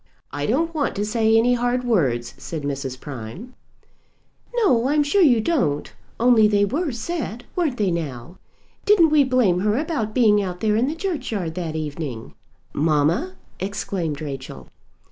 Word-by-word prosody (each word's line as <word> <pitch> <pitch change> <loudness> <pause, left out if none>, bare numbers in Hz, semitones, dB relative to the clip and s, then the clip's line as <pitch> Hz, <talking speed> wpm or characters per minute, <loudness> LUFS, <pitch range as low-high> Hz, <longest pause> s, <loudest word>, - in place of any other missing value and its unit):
"I 145 +1 -3
don't 325 +8 0
want 295 -3 -1
to 205 - -1
say 220 +1 +2
any 240 +2 +4
hard 245 +1 0
words," 135 - 0
said 160 -3 -6
Mrs. 135 -2 -4
Prime. 145 - -8 1.0
"No; 260 - +3
I'm 295 0 +3
sure 385 +8 +2
you 255 -9 +5
don't; 220 - 0 0.3
only 235 -2 +5
they 205 -1 +3
were 290 - -1
said, 240 - -4
weren't 315 -8 0
they, 200 -4 +1
now? 155 -1 -5 0.4
Didn't 380 -7 +5
we 300 -2 +5
blame 250 -9 +2
her 210 +3 +1
about 280 -8 -2
being 210 -4 +4
out 180 -2 -4
there 215 -1 +1
in 235 +4 +2
the 300 - -2
churchyard 260 - -3
that 165 -3 -4
evening?" 145 -6 -5 0.4
"Mamma!" 160 - +1 0.2
exclaimed 185 -6 -3
Rachel. 135 - -7
215 Hz, 155 wpm, -22 LUFS, 160-260 Hz, 1.0 s, you